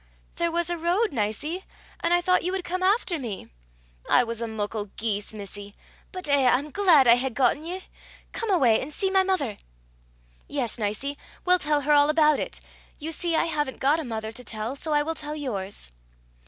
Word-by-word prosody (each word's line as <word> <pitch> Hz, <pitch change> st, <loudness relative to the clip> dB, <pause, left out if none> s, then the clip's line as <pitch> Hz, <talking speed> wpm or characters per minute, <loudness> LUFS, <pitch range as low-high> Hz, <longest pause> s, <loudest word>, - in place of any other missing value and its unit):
"There 340 Hz, 0 st, +1 dB
was 345 Hz, +1 st, 0 dB
a 345 Hz, -, -2 dB
road, 360 Hz, +6 st, +1 dB
Nicie, 275 Hz, -, -2 dB, 0.4 s
and 335 Hz, -, 0 dB
I 350 Hz, 0 st, +5 dB
thought 365 Hz, +1 st, +3 dB
you 360 Hz, -, -1 dB
would 380 Hz, -1 st, -2 dB
come 365 Hz, +1 st, -3 dB
after 375 Hz, -3 st, +2 dB
me." 215 Hz, -, -6 dB, 0.6 s
"I 245 Hz, -, +5 dB
was 230 Hz, -1 st, -5 dB
a 230 Hz, -, -2 dB
muckle 215 Hz, -1 st, -3 dB
geese, 210 Hz, -2 st, -1 dB
missie; 205 Hz, -1 st, -7 dB, 0.4 s
but 370 Hz, -4 st, -6 dB
eh! 280 Hz, -3 st, +4 dB
I'm 280 Hz, +5 st, +1 dB
glaid 345 Hz, -8 st, +5 dB
I 235 Hz, +1 st, +8 dB
hae 265 Hz, +2 st, 0 dB
gotten 260 Hz, +4 st, +1 dB
ye. 365 Hz, +3 st, -5 dB, 0.5 s
Come 455 Hz, -, -3 dB
awa 335 Hz, -11 st, +4 dB
an' 225 Hz, +5 st, +2 dB
see 380 Hz, +5 st, -1 dB
my 385 Hz, 0 st, +5 dB
mither." 365 Hz, -, 0 dB, 0.9 s
"Yes, 250 Hz, -5 st, -2 dB
Nicie. 225 Hz, +7 st, -2 dB, 0.3 s
We'll 360 Hz, 0 st, +5 dB
tell 295 Hz, -2 st, +1 dB
her 290 Hz, +2 st, 0 dB
all 290 Hz, 0 st, +5 dB
about 305 Hz, -1 st, +4 dB
it. -, -, -3 dB, 0.4 s
You 315 Hz, +2 st, -5 dB
see 335 Hz, +1 st, -1 dB
I 320 Hz, -, +3 dB
haven't 295 Hz, -5 st, -2 dB
got 290 Hz, +4 st, +3 dB
a -, -, -3 dB
mother 220 Hz, -4 st, -4 dB
to 250 Hz, +3 st, -9 dB
tell, 225 Hz, +2 st, -4 dB
so 310 Hz, +3 st, -5 dB
I 295 Hz, 0 st, +3 dB
will 325 Hz, +2 st, -2 dB
tell 300 Hz, -1 st, -5 dB
yours." 200 Hz, -, -5 dB
295 Hz, 200 wpm, -26 LUFS, 230-340 Hz, 0.9 s, I